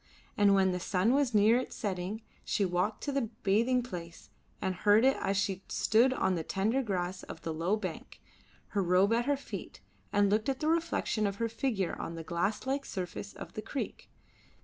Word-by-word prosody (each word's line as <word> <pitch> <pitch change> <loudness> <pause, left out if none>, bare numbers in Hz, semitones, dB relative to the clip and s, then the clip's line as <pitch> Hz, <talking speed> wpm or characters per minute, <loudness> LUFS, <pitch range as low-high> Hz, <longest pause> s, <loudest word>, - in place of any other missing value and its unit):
And 200 -1 +5
when 190 -1 +4
the 180 - -2
sun 190 +6 +2
was 275 -5 +2
near 215 +4 +6
its 255 - -6
setting 200 +1 -3 0.2
she 200 - +1
walked 180 +4 -1
to 285 - -1
the 270 -5 -1
bathing 235 +6 +3
place 170 -7 -8 0.3
and 190 -2 -1
heard 205 +5 +4
it 270 - +5
as 195 - 0
she 195 -1 0
stood 235 +4 +3
on 225 -7 +1
the 170 - -1
tender 215 +10 0
grass 185 -5 -2
of 160 - -10
the 165 - -2
low 170 +7 0
bank, 185 -6 -6 0.5
her 200 - 0
robe 185 +4 +4
at 235 +1 +2
her 285 0 +2
feet, 280 - -8 0.3
and 205 -1 +3
looked 215 +5 +2
at 265 0 -1
the 310 - -1
reflection 325 -10 +1
of 200 - -3
her 230 +3 -1
figure 225 -5 -1
on 165 - -5
the 165 - -6
glass 185 +7 -1
like 275 +1 -1
surface 180 - -5
of - - -9
the - - -4
creek. - - -5
205 Hz, 200 wpm, -31 LUFS, 185-240 Hz, 0.5 s, near